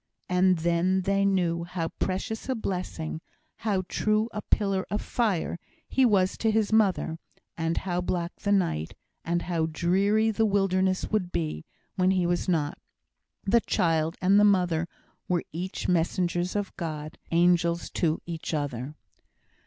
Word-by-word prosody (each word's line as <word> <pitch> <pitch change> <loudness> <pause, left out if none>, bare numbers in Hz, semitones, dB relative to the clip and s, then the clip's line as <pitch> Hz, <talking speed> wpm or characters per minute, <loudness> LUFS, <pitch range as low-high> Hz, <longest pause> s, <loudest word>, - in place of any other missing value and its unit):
And 180 0 +3
then 170 +3 +1
they 195 +1 +1
knew 175 -4 +1
how 170 -1 -3
precious 205 +6 -3
a 260 - +1
blessing 180 -7 -4 0.4
how 200 -4 0
true 215 +3 +1
a 210 - -3
pillar 195 -3 +1
of 210 - -1
fire, 200 -8 -1 0.3
he 265 -1 +3
was 190 -3 +2
to 225 - +2
his 220 -1 +1
mother; 195 -6 +2 0.4
and 165 0 -1
how 180 -1 -1
black 175 -1 -2
the 200 - -2
night, 170 - 0 0.3
and 170 +1 -1
how 165 -3 0
dreary 195 +7 +2
the 220 +1 +2
wilderness 190 -2 +1
would 195 -5 0
be, 75 -2 -3 0.3
when 185 0 +3
he 185 -2 +2
was 175 +2 0
not. 155 -4 0 0.6
The 235 +4 +3
child 165 -3 +1
and 195 +2 +5
the - - +6
mother 180 -5 +3 0.4
were 175 -2 +1
each 180 +4 -4
messengers 175 +1 0
of 205 -1 -2
God 155 -3 -5
angels 170 0 +2
to 160 -2 0
each 165 -1 -4
other. 145 -1 -3
180 Hz, 150 wpm, -27 LUFS, 170-200 Hz, 0.6 s, the